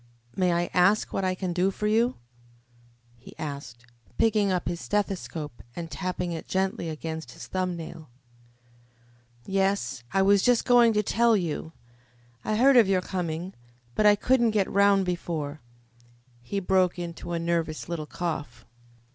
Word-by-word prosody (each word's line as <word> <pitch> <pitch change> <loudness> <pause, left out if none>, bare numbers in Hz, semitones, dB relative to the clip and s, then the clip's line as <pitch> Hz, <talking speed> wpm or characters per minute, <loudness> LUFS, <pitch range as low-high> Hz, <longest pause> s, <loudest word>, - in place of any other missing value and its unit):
"May 180 -2 +2
I 175 0 0
ask 195 +4 +3
what 195 - -1
I 185 0 0
can 185 -1 -3
do 180 +2 +2
for 205 +2 -4
you?" 230 +4 +2 1.0
he 115 - -14
asked, 140 -6 -7 0.3
picking 210 -3 +3
up 180 -2 -1
his 170 0 -3
stethoscope 175 -9 -3
and 165 -2 -6
tapping 180 -1 -3
it 165 - -6
gently 190 -3 -1
against 160 -4 -6
his - - -9
thumb 185 -1 -2
nail. 160 -2 -9 1.4
"Yes, 195 -10 0
I 195 - +3
was 200 0 +5
just 245 +1 +3
going 240 -2 +6
to 210 0 +2
tell 230 +2 +3
you. 165 -2 -3 0.7
I 215 - -1
heard 260 +4 +5
of 230 -5 +7
your 190 -1 +2
coming, 180 0 -4 0.4
but 210 - +3
I 205 - +7
couldn't 240 +2 +3
get 195 - +2
round 200 -1 +4
before 160 -5 -3 0.4
" 120 - -29 0.3
He 200 +12 -3
broke 185 -1 +2
into 175 0 -6
a - - 0
nervous 165 -2 -2
little 165 -3 -4
cough. 155 -8 -5
180 Hz, 155 wpm, -27 LUFS, 165-200 Hz, 1.4 s, of